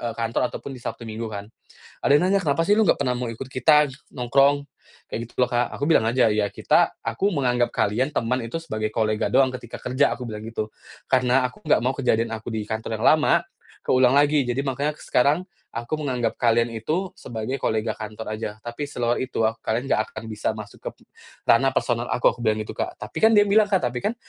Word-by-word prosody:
eee, 120 - -2
kantor 115 +2 0
ataupun 140 - -7
di 125 - -11
Sabtu 120 - -6
Minggu 110 0 -5
kan. 100 -1 -6 0.6
Ada 140 - +5
yang 180 - +2
nanya, 200 0 +3
"Kenapa 145 +2 +2
sih 205 - +5
lu 220 - +4
nggak - - +2
pernah 125 -3 0
mau 125 0 -3
ikut 125 +3 -8
kita 145 +4 +4 0.2
nongkrong?" 140 +3 +2 0.4
Kayak 115 - -4
gitu - - -31
loh, 125 - +3
Kak. 120 -1 +1
Aku 145 - 0
bilang 160 - +4
aja, 120 0 +3
"Ya 105 -1 +1
kita - - +2
aku 155 - -1
menganggap 125 -5 +1
kalian 125 +8 0
teman 125 -1 -1
itu 140 +9 -4
sebagai 110 -7 -3
kolega 110 -1 0
doang, 135 -1 +5
ketika 120 -2 -10
kerja," 130 +3 +1
aku 125 -2 -5
bilang 105 0 -6
gitu. 110 -1 -4 0.4
"Karena 130 0 +3
aku 125 - -19
nggak - - +3
mau 130 +2 -1
kejadian 115 -4 +1
aku 110 +1 -7
di 110 - -2
kantor 110 0 -3
yang - - +1
lama 150 - +3 0.4
keulang 130 0 +3
lagi, 145 -1 +4
jadi 125 +3 -1
makanya 145 +2 -1
aku - - -16
sekarang 145 +7 +2 0.3
aku 120 +7 -3
menganggap 130 -5 -2
kalian 115 0 +2
itu 155 - -2
sebagai 115 +3 -4
kolega 110 0 -1
kantor 110 +1 -7
aja, 110 - -3
tapi 120 +5 -5
seluar 120 -4 -1
itu 130 -3 -2
aku 110 +1 +1
kalian 120 +5 -1
nggak 110 - +3
akan 110 - -7
bisa 110 0 -2
masuk 105 -2 -9
ke - - -1
m - - -40 0.5
ranah 135 +3 +5
personal 120 0 0
aku." 125 - +3
Aku - - -20
bilang 110 0 +2
gitu, 105 - -8
Kak. - - -2
Tapi - - -7
kan 220 - +6
dia 205 - +7
bilang, 210 +1 +4
Kak, 190 -3 +2
"Tapi 125 -1 -1
kan 225 - 0
125 Hz, 220 wpm, -24 LUFS, 115-140 Hz, 0.6 s, dia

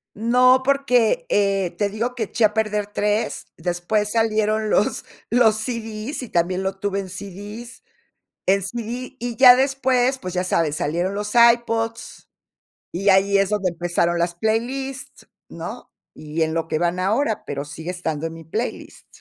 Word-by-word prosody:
No 250 +4 +4
porque, 275 - +2
eh, 195 -3 +1
te 205 - +1
digo 230 +4 -3
que 245 -3 -3
eché 220 +2 +1
a 210 - +1
perder 210 -1 0
3, 210 +1 -1
después 175 +5 -1
salieron 215 -1 +1
los, 210 - +1 0.3
los 230 -3 +4
CDs 225 +2 -4
y 250 - -8
también 180 +2 0
lo 190 0 -3
tuve 200 0 -2
en 190 - -6
CDs 205 - -9 0.6
en 195 +1 +3
CD, 235 +5 -5
y 240 0 -4
ya 250 +1 +9
después, 265 -1 +1
pues 185 -5 -6
ya 180 - 0
sabes, 165 -4 0
salieron 175 +7 -1
los 210 0 -3
iPods 235 -1 +2 0.6
y 195 +4 +1
ahí 195 +1 +4
es 195 0 +1
donde 205 -3 0
empezaron 175 0 0
las 170 0 0
playlists, 255 +7 -3 0.2
¿no? - - -8 0.2
Y 155 +2 -3
en 160 - -1
lo 165 0 -2
que 155 - -1
van 175 +1 0
ahora, 220 +4 0
pero 140 0 -4
sigue 160 +3 -8
estando 165 -4 -3
en 165 - -8
mi 165 - -11
playlist. 220 +10 -5
210 Hz, 160 wpm, -22 LUFS, 180-235 Hz, 0.6 s, ya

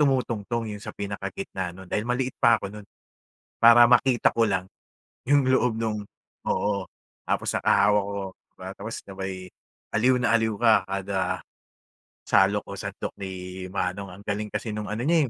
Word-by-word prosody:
tumutungtong, 120 -5 +1
eh, 105 - -7
yung - - -12
sa - - -8
pinakagitna 100 - -5
no'n, 95 - -10
dahil 110 +3 -2
maliit 125 +1 0
pa 115 -1 +6
ako 100 -1 -7
no'n 105 -1 -10 0.8
para 120 +1 +9
makita 125 0 +4
ko 115 - +2
lang, 95 -1 0 0.6
yung 140 0 +3
loob 125 -3 +2
no'ng 110 -2 -1 0.5
oo, 100 -2 0 0.4
tapos - - -1
nakahawak 105 0 +4
ako, 100 +1 -5 0.2
'di - - -52
ba, 95 0 -7
tapos 110 +3 -6
sabay, 95 -1 -6 0.6
aliw 125 +4 +4
na 120 - +1
aliw 110 -1 +2
ka 115 -2 +5 0.2
kada, 95 0 -1 0.9
salok - - +3
o - - -8
sandok - - -5
ni 95 - -4 0.4
manong. 95 +1 -3
Ang 100 +3 -13
galing 105 0 -2
kasi 110 -3 -4
no'ng 105 -2 -4
ano 110 +3 -3
niya, 160 -5 +3
105 Hz, 165 wpm, -26 LUFS, 100-120 Hz, 0.9 s, para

